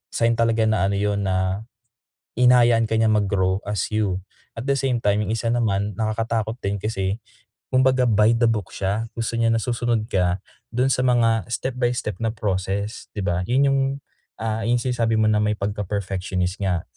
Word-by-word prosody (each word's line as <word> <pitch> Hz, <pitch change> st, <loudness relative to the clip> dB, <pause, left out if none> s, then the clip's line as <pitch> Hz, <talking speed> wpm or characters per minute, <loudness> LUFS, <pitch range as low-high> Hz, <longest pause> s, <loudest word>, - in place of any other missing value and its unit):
sign 115 Hz, 0 st, +3 dB
talaga 115 Hz, -1 st, +2 dB
na 110 Hz, -3 st, +2 dB
ano 100 Hz, -, 0 dB
yun, 100 Hz, 0 st, 0 dB
na 95 Hz, +3 st, -1 dB, 0.7 s
hinahayaan 120 Hz, -2 st, +4 dB
ka 110 Hz, -, +1 dB
niya 110 Hz, -, +3 dB
mag-grow 100 Hz, -2 st, +1 dB
as 105 Hz, -3 st, 0 dB
you. 100 Hz, -4 st, +1 dB, 0.4 s
At 115 Hz, -, -5 dB
the 140 Hz, -, +2 dB
same 135 Hz, -2 st, 0 dB
time, 105 Hz, -2 st, +1 dB
yung 110 Hz, -, -1 dB
1 115 Hz, -, -4 dB
naman 105 Hz, -4 st, 0 dB
nakakatakot 110 Hz, +1 st, -2 dB
din 100 Hz, +1 st, -1 dB
kasi 100 Hz, -1 st, -2 dB, 0.5 s
kumbaga 130 Hz, 0 st, +3 dB
by 110 Hz, -1 st, +4 dB
the 115 Hz, 0 st, +3 dB
book 105 Hz, -5 st, -2 dB
siya, 100 Hz, +4 st, -1 dB
gusto 115 Hz, 0 st, -3 dB
niya 115 Hz, 0 st, +3 dB
na 115 Hz, -, 0 dB
susunod 120 Hz, -2 st, 0 dB
ka 90 Hz, 0 st, +1 dB, 0.3 s
dun 130 Hz, +2 st, +2 dB
sa 125 Hz, -, +1 dB
mga 115 Hz, -4 st, +2 dB
step 125 Hz, +2 st, -3 dB
by 120 Hz, -1 st, +2 dB
step 105 Hz, -5 st, -4 dB
na 115 Hz, -1 st, -2 dB
process, 100 Hz, -1 st, -2 dB
di 100 Hz, -, -2 dB
ba? 90 Hz, 0 st, -1 dB
Yun 130 Hz, +3 st, +3 dB
yung, 135 Hz, 0 st, +2 dB, 0.6 s
ah, 110 Hz, 0 st, -1 dB
yung 120 Hz, +1 st, +3 dB
sinasabi 120 Hz, -3 st, 0 dB
mo 110 Hz, -, +3 dB
na 105 Hz, -, +3 dB
may 105 Hz, 0 st, +1 dB
pagka-perfectionist 95 Hz, -2 st, -2 dB
nga. 90 Hz, -4 st, 0 dB
110 Hz, 185 wpm, -23 LUFS, 100-115 Hz, 0.7 s, hinahayaan